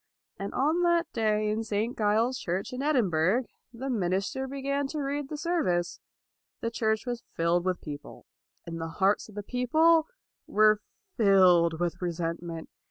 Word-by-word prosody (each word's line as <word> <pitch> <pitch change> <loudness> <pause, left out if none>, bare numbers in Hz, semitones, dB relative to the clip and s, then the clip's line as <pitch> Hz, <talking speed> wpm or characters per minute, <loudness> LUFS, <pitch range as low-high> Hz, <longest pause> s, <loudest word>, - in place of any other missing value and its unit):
And 195 +1 -4
on 310 +6 +2
that 345 -1 +2
day 215 -2 +1
in 220 +1 -1
St. 220 +2 -2
Giles's 225 +4 +1
Church 185 +6 -3
in 250 - -4
Edinburgh, 225 - +2 0.3
the 250 +3 -6
minister 200 +3 -1
began 280 +1 -2
to 305 +2 -4
read 285 0 -2
the 300 - -4
service. 290 - 0 0.6
The 230 - -2
church 220 -1 0
was 240 -2 -3
filled 170 +1 +1
with 185 -1 -1
people, 145 -1 -9 0.4
and 165 -1 -6
the 165 - -3
hearts 200 +2 +2
of 210 - -14
the 205 - -5
people 310 +8 +3 0.4
were 215 0 +4 0.4
filled 180 -6 +5
with 175 0 -2
resentment. 170 -1 -4
215 Hz, 155 wpm, -28 LUFS, 180-270 Hz, 0.6 s, filled